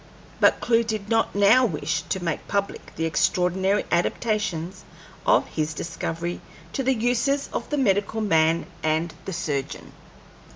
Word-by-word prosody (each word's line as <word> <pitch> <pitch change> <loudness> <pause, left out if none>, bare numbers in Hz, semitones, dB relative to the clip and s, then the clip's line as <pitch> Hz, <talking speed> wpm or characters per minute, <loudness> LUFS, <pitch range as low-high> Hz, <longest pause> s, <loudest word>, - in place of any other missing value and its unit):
But - - +4
Clewe 230 -1 +3
did 215 -2 -4
not 225 -3 +1
now 205 +6 +6
wish 160 -6 -1
to 190 -2 -2
make 165 -3 -3
public 200 -1 -3
the 165 - -1
extraordinary 185 +4 +1
adaptations 185 -1 -1 0.4
of - - +5
his 155 -1 -2
discovery 170 +1 -4 0.3
to - - -1
the 265 0 +2
uses 245 +5 +1
of - - -3
the 295 - -1
medical 205 -3 +1
man 165 -5 +2 0.2
and 160 +2 0
the 190 - -4
surgeon. 140 -4 -3
195 Hz, 140 wpm, -24 LUFS, 165-225 Hz, 0.4 s, now